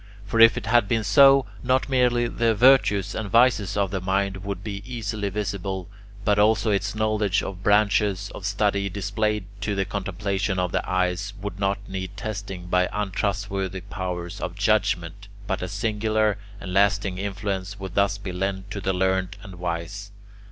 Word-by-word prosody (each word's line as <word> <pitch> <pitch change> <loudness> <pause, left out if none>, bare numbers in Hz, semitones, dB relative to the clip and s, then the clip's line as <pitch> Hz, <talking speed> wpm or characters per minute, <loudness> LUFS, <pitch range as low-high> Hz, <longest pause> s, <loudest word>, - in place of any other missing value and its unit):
For 115 +2 -1
if 115 0 +8
it - - -4
had 115 -1 +3
been 110 +1 +1
so, 135 +5 +6 0.2
not 130 +1 +1
merely 125 -2 +2
the 115 -1 +1
virtues 105 -5 +4
and 110 -2 -4
vices 115 -3 +3
of 100 -2 +1
the 95 -2 -2
mind 95 +1 0
would 100 0 -5
be 100 -2 -5
easily 110 -4 -3
visible, 95 -2 -4 0.4
but 105 0 +3
also 110 +1 +3
its 100 +2 -1
knowledge 110 -2 +1
of 95 -1 -6
branches 105 -1 +2
of - - -9
study, 100 0 0
displayed 105 +1 -1 0.2
to 105 -1 -1
the 95 0 0
contemplation 100 0 -2
of 90 -1 0
the - - +1
eyes, 95 +2 0
would 100 -2 -6
not 100 0 -1
need 95 0 -6
testing 100 -4 -5
by 90 0 +1
untrustworthy 95 -2 -2
powers 90 0 -5
of 85 - -4
judgement, 100 -2 0 0.2
but 95 -2 -2
a 90 - -3
singular 110 0 0 0.2
and 90 -1 -6
lasting 95 -1 +2
influence 100 0 -4
would 95 -2 -6
thus 100 0 +2
be 100 -2 -6
lent 95 +2 -3
to 100 - -4
the 95 0 0
learned 95 +1 0
and 95 -4 -10
wise. 90 +4 -4
100 Hz, 170 wpm, -24 LUFS, 95-105 Hz, 0.4 s, if